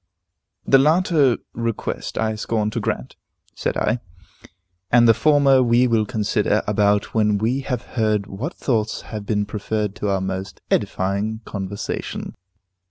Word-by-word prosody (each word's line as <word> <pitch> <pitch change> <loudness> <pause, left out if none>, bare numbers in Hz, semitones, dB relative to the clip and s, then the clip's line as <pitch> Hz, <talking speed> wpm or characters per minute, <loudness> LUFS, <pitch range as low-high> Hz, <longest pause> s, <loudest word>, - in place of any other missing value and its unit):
"The 135 - +6
latter 155 -3 +3 0.2
request 115 -1 -3
I 110 0 0
scorn 110 0 -1
to - - -2
grant," 65 - -3 0.4
said - - -2
I, 115 +3 +1 0.9
"and 120 -1 +6
the 115 - +7
former 140 +2 +4
we 120 0 +4
will 110 -3 +1
consider 105 -2 0
about 105 0 +1
when 105 -2 +2
we 115 +6 0
have 125 -3 -3
heard 110 -4 0
what 110 - -5
thoughts 110 -4 -1
have 105 -2 -7
been 105 -2 0
preferred 105 0 -2
to 105 - -2
our 95 -1 +1
most 95 0 -4
edifying 100 +4 0
conversation." 100 0 -5
110 Hz, 140 wpm, -22 LUFS, 105-120 Hz, 0.9 s, the